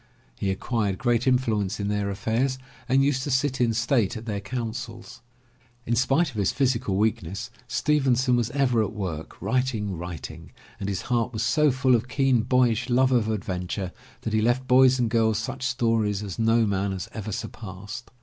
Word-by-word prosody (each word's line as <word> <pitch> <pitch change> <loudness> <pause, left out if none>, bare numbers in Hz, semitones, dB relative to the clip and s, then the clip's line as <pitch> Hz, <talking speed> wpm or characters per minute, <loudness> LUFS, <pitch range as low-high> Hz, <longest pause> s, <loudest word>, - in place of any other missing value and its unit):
He 95 - -2
acquired 100 0 -1
great 120 +1 +1
influence 110 -6 +1
in 100 - -2
their 105 -1 -1
affairs 115 +6 0 0.3
and 135 +1 +4
used 135 -2 +1
to 145 - -3
sit 130 0 +1
in 120 -2 +3
state 115 -1 +1
at 110 - -8
their 105 -3 -2
councils. 115 +2 -6 0.6
In 120 - +1
spite 135 +7 +2
of 110 - -10
his 100 - +2
physical 125 -8 0
weakness, 105 0 -1 0.2
Stevenson 130 -4 +2
was 120 -2 +1
ever 125 -4 +2
at 105 - -4
work, 90 -7 -5
writing, 115 -7 0
writing, 85 -1 -8 0.3
and 100 - -3
his 95 - -3
heart 120 -1 0
was 110 +1 -2
so 150 +6 +3
full 130 0 +2
of 120 +1 +2
keen 135 -3 +2
boyish 125 0 +2
love 130 +2 +3
of 115 -4 +2
adventure 95 -2 -3 0.3
that 110 - -4
he 110 - +3
left 120 +3 +1
boys 130 0 +6
and 120 -2 +1
girls 110 -1 +2
such 110 +3 -4
stories 115 -6 0
as 100 -2 -6
no 115 0 +3
man 100 -1 0
has 95 - -5
ever 110 -1 -5
surpassed. 100 +2 -7
115 Hz, 180 wpm, -25 LUFS, 105-130 Hz, 0.6 s, boys